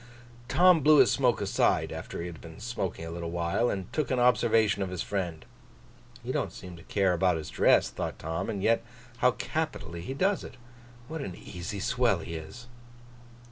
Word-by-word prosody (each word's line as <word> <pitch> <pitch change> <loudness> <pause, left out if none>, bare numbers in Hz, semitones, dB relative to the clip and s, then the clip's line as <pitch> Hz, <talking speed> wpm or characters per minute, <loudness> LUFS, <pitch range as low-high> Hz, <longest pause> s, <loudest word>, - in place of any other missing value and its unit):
Tom 180 +4 +5
blew 150 +2 +6
his - - +6
smoke 125 -5 +2
aside, 100 - +1
after - - -6
he - - -4
had 85 -2 -8
been 80 +2 -11
smoking 105 -7 -4
a 80 - -6
little 85 0 -5
while, 85 +8 0
and 95 -2 -4
took 155 - -1
an 130 - +1
observation 115 -4 +3
of 95 - -1
his 90 -2 -3
friend. 90 -6 -3 0.8
'He - - -3
don't - - -1
seem 90 -1 -10
to - - -13
care 95 +1 +1
about 90 0 +2
his 75 -1 -6
dress,' - - +4
thought - - -4
Tom, 80 +1 -3
'and 100 -2 -3
yet 115 0 +3 0.3
how 125 - +4
capitally 125 - -3
he 130 +10 -5
does 190 +6 +1
it. - - -10 0.5
What 160 0 -5
an 95 -10 -5
easy 95 +4 -7
swell 120 0 +2
he 85 0 -7
is! 80 +10 -8
100 Hz, 190 wpm, -28 LUFS, 85-125 Hz, 0.8 s, blew